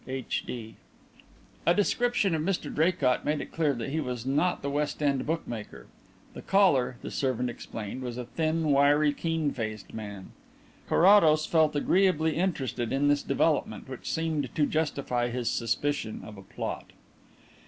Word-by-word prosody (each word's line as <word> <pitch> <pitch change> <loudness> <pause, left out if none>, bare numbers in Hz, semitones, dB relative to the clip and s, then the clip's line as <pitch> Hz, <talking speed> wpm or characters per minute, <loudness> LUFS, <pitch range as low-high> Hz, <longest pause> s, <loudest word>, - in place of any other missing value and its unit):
H. 130 -1 -3
D." 115 -3 -6 0.9
A 170 - +3
description 210 -2 +1
of 160 - 0
Mr 185 +3 -2
Draycott 155 -6 +2
made 150 0 0
it - - -7
clear 150 -4 +1
that 120 +3 -4
he 160 - -1
was 125 -5 -4
not 150 +7 +1
the 140 - -1
West 150 +1 -2
End 140 -2 +1
bookmaker. 120 -9 -4 0.5
The - - -8
caller, 145 -11 +3
the - - -6
servant 125 -2 -1
explained, 115 +1 -7
was 125 -1 -5
a 125 - -4
thin, 160 +2 0
wiry, 145 +1 +4
keen 160 -1 -1
faced 110 -5 -5
man. 100 -3 -7 0.6
Carrados 165 -5 +6
felt 155 -2 +2
agreeably 160 0 +2
interested 135 -9 -1
in 140 +2 +2
this 145 0 +3
development, - - 0
which - - -7
seemed 160 -2 -1
to 150 - +3
justify 140 -6 -1
his 120 -1 -1
suspicion 115 0 -1
of 105 - -10
a 100 - -11
plot. 95 - -6
145 Hz, 155 wpm, -28 LUFS, 125-160 Hz, 0.9 s, Carrados